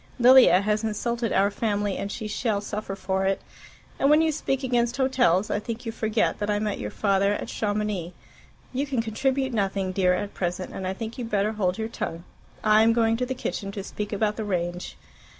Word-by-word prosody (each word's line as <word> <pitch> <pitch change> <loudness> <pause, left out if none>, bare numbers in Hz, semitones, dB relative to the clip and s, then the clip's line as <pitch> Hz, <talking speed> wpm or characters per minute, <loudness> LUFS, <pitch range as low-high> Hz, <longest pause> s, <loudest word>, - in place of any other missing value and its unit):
Lilia 250 -6 +7
has 210 +1 0
insulted 235 +2 -1
our 200 +2 +3
family, 205 -2 -1
and 200 - -4
she 220 -1 -5
shall 210 0 -1
suffer 205 -1 -5
for 190 0 -1
it. 195 - +1 0.6
And 275 - +3
when 300 +1 +6
you 320 0 +3
speak 270 -3 -2
against 240 -1 +1
hotels, 245 -8 +2
I 205 - +1
think 230 +3 -6
you 225 - -2
forget 220 0 0
that 205 0 -2
I 205 - +2
met 210 -1 -2
your - - -4
father 200 -1 +1
at - - -4
Chamounix. 205 -4 -2 0.6
You 275 +3 -1
can 255 -4 0
contribute 265 +4 0
nothing, 195 -3 0
dear, 180 -1 +2
at 205 +2 -4
present, 180 0 -3
and 190 - -4
I 190 - -2
think 225 +3 -6
you 245 - -3
had 225 - -10
better 205 +1 +1
hold 190 -4 -1
your 220 0 -2
tongue. 170 -6 -5 0.4
I 215 0 +5
am 225 +1 +5
going 225 -1 +3
to 250 +1 -1
the 260 - -3
kitchen, 200 -5 -4
to 200 - -5
speak 210 +1 -5
about 210 0 0
the 220 - -2
range." 175 -3 -3
210 Hz, 215 wpm, -25 LUFS, 195-235 Hz, 0.6 s, Lilia